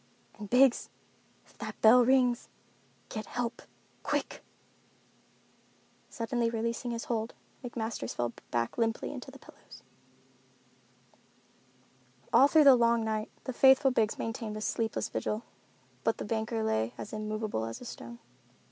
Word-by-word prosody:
And 210 Hz, -1 st, -7 dB
Biggs—if 255 Hz, 0 st, 0 dB
that -, -, -6 dB
bell 240 Hz, +3 st, +7 dB
rings, 250 Hz, -1 st, +2 dB, 0.6 s
get 215 Hz, -2 st, -5 dB
help—quick!" 240 Hz, -1 st, -5 dB, 1.7 s
Suddenly 230 Hz, 0 st, -1 dB
releasing 230 Hz, +1 st, -2 dB
his 235 Hz, -1 st, -3 dB
hold, 225 Hz, -1 st, -3 dB, 0.3 s
McMasters 225 Hz, -, -4 dB
fell 120 Hz, -1 st, -2 dB, 0.2 s
back 120 Hz, -, -2 dB
limply 225 Hz, 0 st, 0 dB
among -, -, -6 dB
the -, -, -11 dB
pillows. -, -, -16 dB, 2.5 s
All 275 Hz, -, +8 dB
through 310 Hz, +1 st, +5 dB
the 275 Hz, -2 st, +9 dB
long 235 Hz, -1 st, +3 dB
night 215 Hz, 0 st, -2 dB
the 260 Hz, -, -4 dB
faithful 265 Hz, +2 st, +6 dB
Biggs 225 Hz, -3 st, +1 dB
maintained 225 Hz, -1 st, -4 dB
a -, -, -6 dB
sleepless 220 Hz, +1 st, -1 dB
vigil, 215 Hz, +2 st, -3 dB, 0.6 s
but 225 Hz, -, +1 dB
the -, -, -5 dB
banker 220 Hz, +1 st, -2 dB
lay 110 Hz, -, 0 dB
as 210 Hz, -, -8 dB
immovable 215 Hz, -, -3 dB
as 115 Hz, -, -6 dB
a -, -, -10 dB
stone. 120 Hz, -, -9 dB
225 Hz, 125 wpm, -30 LUFS, 215-245 Hz, 2.5 s, the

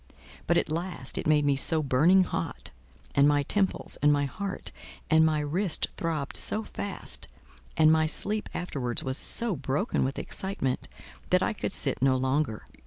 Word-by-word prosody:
But, 170 Hz, -, +3 dB
at -, -, +1 dB
last, 175 Hz, +3 st, -1 dB
it -, -, -3 dB
made 150 Hz, -1 st, +4 dB
me 140 Hz, -1 st, +3 dB
so 155 Hz, +3 st, 0 dB
burning 155 Hz, +8 st, +4 dB
hot, -, -, -4 dB, 0.4 s
and 140 Hz, +1 st, +5 dB
my 145 Hz, -1 st, +3 dB
temples, 195 Hz, +6 st, -1 dB
and 150 Hz, -, +5 dB
my 145 Hz, -1 st, +2 dB
heart, 195 Hz, +8 st, -5 dB, 0.4 s
and 160 Hz, 0 st, +6 dB
my 155 Hz, -1 st, +2 dB
wrist 165 Hz, +5 st, +1 dB
throbbed 155 Hz, -4 st, -3 dB
so 215 Hz, -, 0 dB
fast, 200 Hz, -2 st, -5 dB, 0.5 s
and 155 Hz, 0 st, +6 dB
my 160 Hz, 0 st, +3 dB
sleep 210 Hz, +6 st, -1 dB
afterwards 135 Hz, -9 st, -2 dB
was 130 Hz, +1 st, -1 dB
so 230 Hz, -5 st, +1 dB
broken 145 Hz, -, -1 dB
with 135 Hz, +1 st, -2 dB
excitement, 190 Hz, -10 st, -3 dB, 0.4 s
that -, -, +3 dB
I -, -, 0 dB
could -, -, -4 dB
sit -, -, -1 dB
no 130 Hz, 0 st, +4 dB
longer. 130 Hz, -3 st, -1 dB
155 Hz, 170 wpm, -28 LUFS, 135-180 Hz, 0.5 s, and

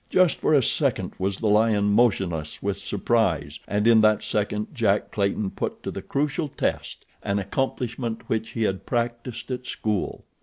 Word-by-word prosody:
Just 185 Hz, -3 st, +4 dB
for 155 Hz, -, +2 dB
a 135 Hz, -, +4 dB
second -, -, 0 dB
was 95 Hz, +1 st, -1 dB
the -, -, -5 dB
lion 105 Hz, -1 st, +3 dB
motionless 95 Hz, -9 st, +1 dB
with -, -, -1 dB
surprise 80 Hz, -11 st, 0 dB
and 105 Hz, +1 st, 0 dB
in 115 Hz, -1 st, +7 dB
that 110 Hz, -1 st, +4 dB
second 105 Hz, +2 st, -2 dB
Jack 105 Hz, -6 st, +1 dB
Clayton 100 Hz, -1 st, 0 dB
put -, -, -4 dB
to -, -, -3 dB
the -, -, -5 dB
crucial 150 Hz, +3 st, -1 dB
test 140 Hz, -, -3 dB, 0.2 s
an 100 Hz, 0 st, -1 dB
accomplishment 120 Hz, +2 st, -2 dB
which 110 Hz, 0 st, -1 dB
he 115 Hz, -, -1 dB
had 95 Hz, -3 st, -2 dB
practiced 120 Hz, +1 st, -3 dB
at 125 Hz, 0 st, -4 dB
school. 105 Hz, -3 st, -2 dB
110 Hz, 165 wpm, -25 LUFS, 100-120 Hz, 0.2 s, in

